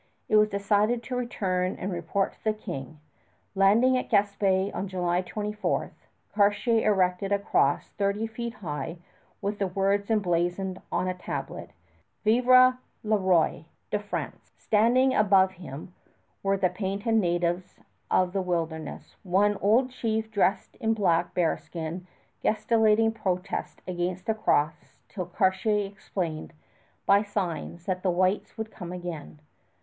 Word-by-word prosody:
It - - +2
was 210 0 +5
decided 210 +4 +1
to 250 - -4
return 185 -7 -1
and 195 - -4
report 175 +3 -1
to - - -30
the 215 - +2
King. 160 - -7 0.5
Landing 210 +7 +4
at - - -6
Gaspé 200 -2 +2
on 190 +3 -3
July 180 -1 0
24, 210 +2 -2 0.4
Cartier 215 +2 +3
erected 185 0 +1
a 200 - +4
cross 145 -8 +1
thirty 200 +2 -1
feet 230 +1 -5
high 165 +3 -4 0.5
with 205 +1 -2
the 195 - +1
words 195 +2 0
emblazoned 185 -2 0
on 185 - 0
a 185 - 0
tablet, 180 - -6 0.5
Vive 235 +4 +2 0.6
le 215 0 +2
Roi 180 -5 +2 0.3
de 210 - +1
France. 205 0 -6
Standing 245 +5 +3
about 195 -3 +4
him 170 -2 -9 0.5
were 195 0 +1
the 190 -1 +2
painted 200 +4 -2
natives 175 -3 0 0.3
of 185 0 +2
the 195 - 0
wilderness, 165 -3 -4
one 200 +2 +2
old 235 +7 +3
chief 220 -3 -2
dressed 195 -2 0
in 225 -2 0
black 175 -5 +1
bearskin 170 0 -2 0.3
gesticulating 220 0 +3
protest 190 -3 -3
against 180 +1 -3
the 220 - +1
cross 155 -8 0
till 185 -4 -5
Cartier 200 +3 +1
explained 180 -6 -5 0.5
by 200 +1 +5
signs 180 -4 -4
that 185 -1 -2
the 185 - +1
whites 185 +5 0
would 220 0 -5
come 180 -3 -8
again. 175 -4 -7
195 Hz, 135 wpm, -27 LUFS, 180-215 Hz, 0.6 s, was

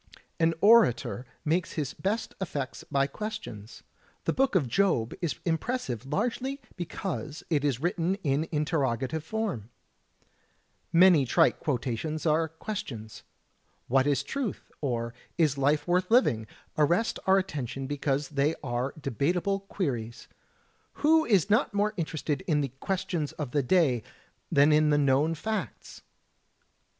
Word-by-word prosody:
An 165 0 +3
orator 165 - +4 0.2
makes 165 +4 0
his 145 -4 -3
best 210 +4 -2
effects 145 -7 -4
by 140 0 +1
questions. 140 - -7 0.4
The - - +1
Book 270 -4 +1
of 155 -8 +3
Job 120 - +1
is 170 -4 -1
impressive 160 - -2
largely 250 - -1 0.2
because 165 -3 -5
it 145 -3 +2
is 140 -5 +1
written 175 +3 0
in 145 +1 +1
interroga 145 -6 0
tive 160 +4 -4
form. 175 - -3 1.2
Many 170 -3 +6
trite 160 +6 +3
quotations 140 +3 -2
are 160 +1 +3
questions. 145 - -6 0.7
"What 135 +2 +3
is 145 -2 +2
truth?" 270 -7 -4
or 120 -4 -2 0.2
"Is 155 -5 +3
life 145 +3 +1
worth 180 +1 +1
living?" 120 - +3 0.3
arrest 170 +9 +2
our 190 0 +6
attention 135 -8 -3
because 140 0 -1
they 145 +2 +1
are 125 +1 -2
debatable 170 - 0
queries. 130 - -4 0.8
Who 315 +1 +5
is 200 -7 +3
not 215 -1 +2
more 210 +1 +1
interested 155 -3 -2
in 150 -4 +2
the 135 -3 -2
Questions 175 -5 -2
of 145 -5 -5
the 145 - +2
Day 135 -4 +3 0.5
than 145 +2 +5
in 150 0 +4
the 145 - +4
known 145 +3 +3
facts? 200 - -5
155 Hz, 135 wpm, -28 LUFS, 135-185 Hz, 1.2 s, Many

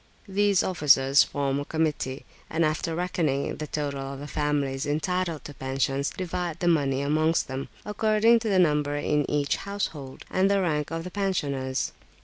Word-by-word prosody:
These 200 -1 +2
officers 140 -5 +5
form 140 -1 -1
a 145 - -4
committee, 150 -5 -2 0.2
and 165 +1 +1
after 160 +2 -1
reckoning 170 -6 -1
the 155 - -5
total 145 -2 -3
of 135 0 -6
the 145 - -7
families 145 -2 -1
entitled 165 +2 -1
to 145 - -7
pensions, 135 +1 -1
divide 175 -2 -4
the 175 - 0
money 140 -5 +2
amongst 155 +3 +2
them, 135 0 -5 0.2
according 215 +2 +3
to 225 -1 -2
the 195 - +3
number 150 -4 +2
in 145 0 0
each 145 -1 +1
household, 165 -9 -5
and 190 +1 +3
the 200 0 +3
rank 150 -5 0
of 165 +1 -4
the 180 - -7
pensioners. 140 -10 -1
150 Hz, 165 wpm, -26 LUFS, 140-180 Hz, 0.2 s, officers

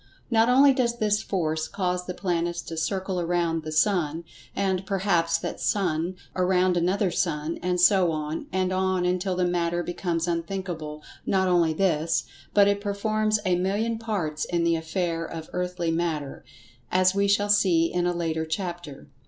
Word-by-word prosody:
Not 225 +1 +4
only 270 +2 +6
does 240 -2 0
this 210 -1 +1
Force 160 -6 -1
cause 180 -2 -2
the 180 - -4
planets 170 -2 -1
to 165 - -7
circle 190 +3 -2
around 170 -1 0
the 155 0 -6
sun, 165 -2 +1 0.3
and, 190 -1 0
perhaps 180 -4 +1
that - - -5
sun 175 -2 0 0.2
around 185 0 +2
another 185 +2 +1
sun, 160 -2 -1
and 180 0 0
so 180 -1 +5
on, 155 0 -4
and 185 0 0
on 185 -1 +1
until 180 +1 0
the 180 0 +1
matter 175 0 0
becomes 175 -1 -2
unthinkable—not 170 0 -3
only 170 -3 +3
this, 165 -2 +1 0.3
but 200 -1 +5
it 200 0 +1
performs 215 +1 0
a 180 -1 +3
million 205 +5 -1
parts 175 -10 -2
in 170 -1 -1
the 170 0 +3
affair 165 +1 -2
of 165 -1 -7
earthly 180 -2 -2
Matter, 160 -4 -2 0.5
as 185 0 +4
we 200 0 +2
shall 205 +1 +2
see 175 -5 +3
in 175 0 +1
a - - +2
later 160 -2 -1
chapter. 170 -3 -5
180 Hz, 160 wpm, -26 LUFS, 165-195 Hz, 0.5 s, only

